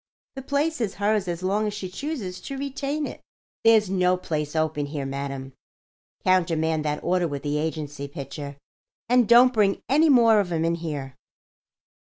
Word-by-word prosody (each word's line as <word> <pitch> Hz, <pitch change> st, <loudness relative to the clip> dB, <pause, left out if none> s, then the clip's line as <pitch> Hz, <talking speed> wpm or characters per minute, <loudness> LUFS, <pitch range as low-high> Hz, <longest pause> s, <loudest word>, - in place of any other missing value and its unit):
The 270 Hz, -, -7 dB
place 285 Hz, +2 st, -1 dB
is 205 Hz, -4 st, -2 dB
hers 205 Hz, -1 st, 0 dB
as 175 Hz, 0 st, -4 dB
long 205 Hz, +3 st, +1 dB
as 210 Hz, -, -4 dB
she 200 Hz, -2 st, -5 dB
chooses 195 Hz, -, -5 dB
to 275 Hz, -, -6 dB
retain 280 Hz, +2 st, -3 dB
it. -, -, -8 dB, 0.4 s
There's 225 Hz, -2 st, +5 dB
no 185 Hz, -1 st, +2 dB
place 150 Hz, -4 st, -3 dB
open 155 Hz, -2 st, 0 dB
here, 145 Hz, -1 st, -4 dB
madam. 135 Hz, -1 st, -5 dB, 0.7 s
Countermand 160 Hz, -4 st, +2 dB
that 150 Hz, 0 st, -2 dB
order 180 Hz, 0 st, +1 dB
with 145 Hz, -3 st, -5 dB
the 150 Hz, 0 st, -1 dB
agency, 150 Hz, -3 st, -4 dB
Pitcher, 140 Hz, 0 st, -7 dB, 0.5 s
and 245 Hz, -2 st, +3 dB
don't 245 Hz, +2 st, +7 dB
bring 205 Hz, -3 st, +2 dB
any 305 Hz, +5 st, +4 dB
more 230 Hz, -5 st, +6 dB
of 190 Hz, -3 st, -1 dB
'em 165 Hz, -1 st, 0 dB
in 165 Hz, -, +1 dB
here." 145 Hz, -6 st, -5 dB
180 Hz, 170 wpm, -25 LUFS, 150-225 Hz, 0.7 s, don't